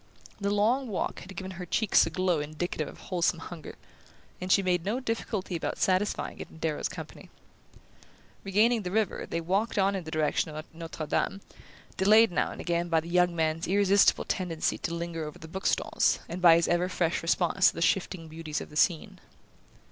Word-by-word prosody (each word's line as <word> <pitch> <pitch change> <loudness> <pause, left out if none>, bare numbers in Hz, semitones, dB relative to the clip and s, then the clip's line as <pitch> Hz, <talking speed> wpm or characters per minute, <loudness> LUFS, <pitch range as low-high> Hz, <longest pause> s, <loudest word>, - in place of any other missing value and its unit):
The 200 0 -1
long 225 +6 +2
walk 205 - -3
had 190 +1 -11
given 190 +2 -6
her 185 -1 -7
cheeks 220 +4 +3
a - - -2
glow 185 -3 0
indicative 155 +2 -3
of - - -11
wholesome 175 -1 0
hunger, 165 -1 -9 0.7
and 185 +1 -2
she 195 - +5
made 180 -2 +1
no 210 +7 -1
difficulty 225 -6 -3
about 165 - -3
satisfying 190 +2 0
it - - -7
in - - -15
Darrow's 160 -2 -2
company. - - -9 1.1
Regaining 220 +4 +3
the 180 - -4
river 210 0 -1
they 165 - -1
walked 195 +7 -1
on 195 0 +2
in 190 - -3
the 160 - -8
direction 155 0 0
of 155 +1 -6
Notre 165 -1 -6
Dame, 195 +5 -1 0.6
delayed 215 +2 +6
now - - 0
and - - -9
again 170 0 -1
by 165 -1 +3
the 165 +2 -8
young 180 0 +3
man's 160 +1 0
irresistible 200 +1 +4
tendency 170 -4 -1
to - - -3
linger 170 -1 -4
over 150 -1 -7
the 160 - -11
bookstalls, 190 +4 +1
and 180 +2 -6
by 170 -2 +8
his 170 0 +2
ever 175 +1 +1
fresh 175 -2 0
response 175 +2 +3
to - - -10
the 165 - -5
shifting 175 -1 0
beauties 155 -1 -5
of - - -9
the - - -12
scene. 160 +1 +1
180 Hz, 195 wpm, -28 LUFS, 165-195 Hz, 1.1 s, by